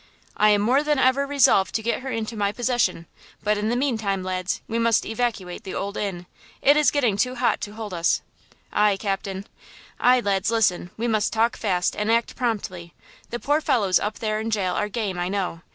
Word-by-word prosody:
"I 210 - +4
am 205 -1 +4
more 250 +7 +3
than 300 -1 +1
ever 265 +2 +3
resolved 275 -9 +3
to 220 - -1
get 235 +3 -1
her 265 - -5
into 225 -1 -3
my 200 -1 0
possession! 235 -8 0 0.4
But 210 0 +1
in 210 +1 -1
the 240 - +1
mean 250 -3 0
time, 195 -3 -1
lads, 185 0 -2
we 230 +1 -2
must 230 -1 +2
evacuate 220 -6 -3
the 190 - -6
Old 200 +1 -3
Inn! 185 -4 -3 0.3
It 285 - +5
is 300 0 +4
getting 245 -9 +1
too 250 +4 0
hot 245 0 +1
to 205 - -5
hold 215 -3 -7
us!" 170 -1 +1 0.5
"Aye, 210 -2 +3
captain!" 195 -1 -3 0.5
"Aye, 250 +1 +5
lads, 200 -1 0
listen! 200 -6 +1
We 235 +2 -1
must 215 -2 +1
talk 230 +1 +1
fast 180 -5 0
and 210 +1 0
act 230 0 +1
promptly; 190 -8 -3 0.3
the 240 - -3
poor 295 +4 +1
fellows 200 - +2
up 210 +1 -3
there 215 -1 -1
in 220 +1 -3
jail 195 -5 0
are 210 +2 -1
game 200 -4 -3
I 175 +1 -1
know! 185 -4 -2
215 Hz, 210 wpm, -24 LUFS, 195-240 Hz, 0.5 s, It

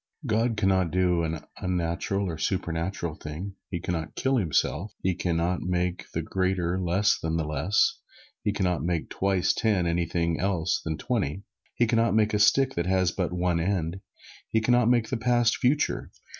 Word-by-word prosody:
God 115 -1 +1
can 95 -2 +2
not 95 -2 +2
do 90 0 +2
an 80 -1 -2 0.2
unnatural 90 +2 -1
or 85 - -3
a 80 - -7
supernatural 85 -1 -2
thing. 80 +6 -7 0.2
He 85 - -3
can 90 - -3
not 80 -1 -4
kill 135 0 +1
Himself. 90 - 0
He 95 - +2
can 85 -1 -1
not 85 +2 0
make 90 0 -1
the - - -2
greater 95 -1 0
less 95 +4 +2
than 80 0 -1
the 80 - 0
less. 75 +7 +1 0.4
He 105 - +1
can 100 - -2
not 90 -2 +1
make 85 -1 -2
twice 95 -2 +1
ten 105 -6 +1
anything 85 -1 0
else 90 -3 0
than 80 -1 -3
twenty. 100 - -2 0.3
He 120 - +3
can 115 0 +1
not 115 -1 +2
make 110 -1 +3
a 105 - +2
stick 135 +5 +4
that 85 +1 -2
has 95 -2 +2
but 90 -2 -2
one 90 -1 0
end. 90 0 -1 0.5
He 110 - +2
can 110 +2 +1
not 120 -1 +4
make 120 -3 +2
the 130 - -1
past, 120 0 +2
future. 145 +4 +1
90 Hz, 195 wpm, -27 LUFS, 85-105 Hz, 0.5 s, stick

